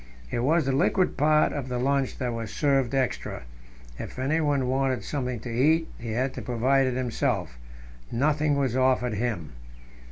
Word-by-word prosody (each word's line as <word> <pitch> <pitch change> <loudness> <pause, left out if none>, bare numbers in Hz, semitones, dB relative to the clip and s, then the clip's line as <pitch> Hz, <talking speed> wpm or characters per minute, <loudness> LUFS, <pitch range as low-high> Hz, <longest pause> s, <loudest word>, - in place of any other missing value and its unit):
It - - -1
was 155 +5 +2
the 135 - +1
liquid 160 +7 +2
part 150 +1 +3
of 140 -3 -4
the 125 - -2
lunch 135 +1 0
that 125 -3 -2
was 115 -2 -5
served 135 -3 +1
extra; 130 - -2 0.6
if - - -7
anyone 140 0 +1
wanted 130 -3 0
something 125 0 -3
to 120 - -6
eat, 155 +7 +3
he 115 -1 -4
had 130 +3 0
to - - -6
provide 130 +3 +2
it 125 - -1
himself 120 - -1 0.5
nothing 150 +3 +2
was 135 -4 0
offered 130 -2 +2
him. 105 -7 -2
130 Hz, 165 wpm, -26 LUFS, 120-140 Hz, 0.6 s, part